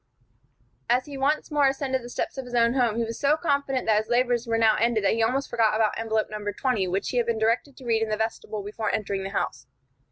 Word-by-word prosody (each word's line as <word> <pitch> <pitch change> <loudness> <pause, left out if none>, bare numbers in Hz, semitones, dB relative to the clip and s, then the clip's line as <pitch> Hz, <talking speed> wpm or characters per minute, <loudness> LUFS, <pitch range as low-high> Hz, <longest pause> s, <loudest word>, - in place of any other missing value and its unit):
As 250 +2 +2
he 290 -2 -8
once 285 +4 0
more 290 -2 +4
ascended 270 -1 -1
the 240 - -9
steps - - -3
of 265 -2 -5
his 245 0 -6
own 235 0 +4
home, 245 -5 +2
he 235 - +1
was 230 0 -5
so 290 +2 +3
confident 280 -4 0
that 215 -1 +4
his 220 +1 -6
labors 245 0 +1
were 230 0 +1
now 220 -1 +4
ended 230 -1 +1
that 195 - +3
he 225 - 0
almost 260 +5 +1
forgot 225 -3 +2
about 215 -1 +2
envelope 220 -1 0
No. 210 -1 -5
20, 220 -3 0
which 190 +3 -1
he 250 - -2
had 235 -1 +1
been 235 -1 0
directed 230 +5 0
to 260 - -12
read 225 -2 +1
in 225 - 0
the 215 - -1
vestibule 220 -1 -3
before 210 +1 -3
entering 200 -2 -2
the 195 - -4
house. 160 - -3
230 Hz, 255 wpm, -25 LUFS, 220-260 Hz, -, more